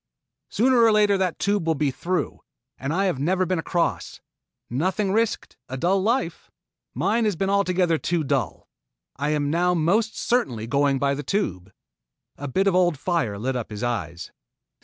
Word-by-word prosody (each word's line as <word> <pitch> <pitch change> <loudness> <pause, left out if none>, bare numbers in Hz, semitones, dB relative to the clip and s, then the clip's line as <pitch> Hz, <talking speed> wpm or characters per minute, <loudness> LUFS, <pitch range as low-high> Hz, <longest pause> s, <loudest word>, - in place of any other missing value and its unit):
"Sooner 245 +2 +3
or 225 -1 +6
later 210 -1 +4
the 185 -3 0
Tube 200 -4 0
will 160 - +2
be 145 -1 0
through, 180 +7 -2 0.4
and 135 +2 -3
I 190 +5 +1
have 180 -9 0
never 185 +6 +1
been 180 -1 -1
across. 170 +1 -2 0.5
Nothing 185 - -1
risked 225 +2 -1
a 130 - -4
dull 185 +7 +2
life. 220 -5 -1 0.5
Mine 220 +5 +1
has 210 -3 +1
been 195 +3 -1
altogether 180 -4 +2
too 170 -2 -1
dull. 135 - -2 0.5
I 145 +2 -1
am 145 -1 0
now 180 +2 +2
most 200 +8 +1
certainly 125 - 0
going 140 +2 +2
by 140 +1 +1
the 140 - -3
Tube." 100 - -2 0.6
A 145 - -6
bit 190 +9 +1
of 195 - +3
the 180 - +4
old 175 -4 +2
fire 150 - -1
lit 130 +5 -2
up 120 -3 -4
his 105 +1 -6
eyes. 90 -9 -3
175 Hz, 180 wpm, -24 LUFS, 140-195 Hz, 0.6 s, or